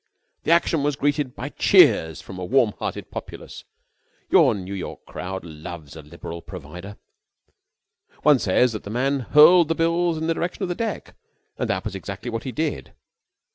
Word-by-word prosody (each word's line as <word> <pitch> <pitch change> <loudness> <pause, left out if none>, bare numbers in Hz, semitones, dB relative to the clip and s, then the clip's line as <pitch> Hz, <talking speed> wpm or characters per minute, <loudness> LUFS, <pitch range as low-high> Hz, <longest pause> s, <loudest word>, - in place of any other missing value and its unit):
The - - +2
action 170 -2 +3
was 145 0 0
greeted 145 -2 -1
by - - -5
cheers 80 -1 +4
from 95 - -10
a - - -5
warm 115 +1 +2
hearted - - -5
populace. - - -9 0.7
Your - - +5
New 95 0 -6
York 95 - -7
crowd 95 +1 -6
loves 80 -2 -9
a 80 - -9
liberal 85 +2 -9
provider. 90 +4 -10 1.3
One 150 -3 +5
says 115 +5 +2
that 110 - -5
the - - -8
man 135 +5 0
hurled 155 +7 +6
the 165 - 0
bills 170 0 +1
in 160 - -3
the 165 - +1
direction 175 +4 -3
of 185 - -2
the - - 0
deck, 220 +3 -4 0.5
and - - -1
that - - -1
was 105 - -4
exactly 100 +4 -6
what 115 0 -4
he 130 - -3
did. 155 +4 -3
120 Hz, 175 wpm, -23 LUFS, -, 1.3 s, hurled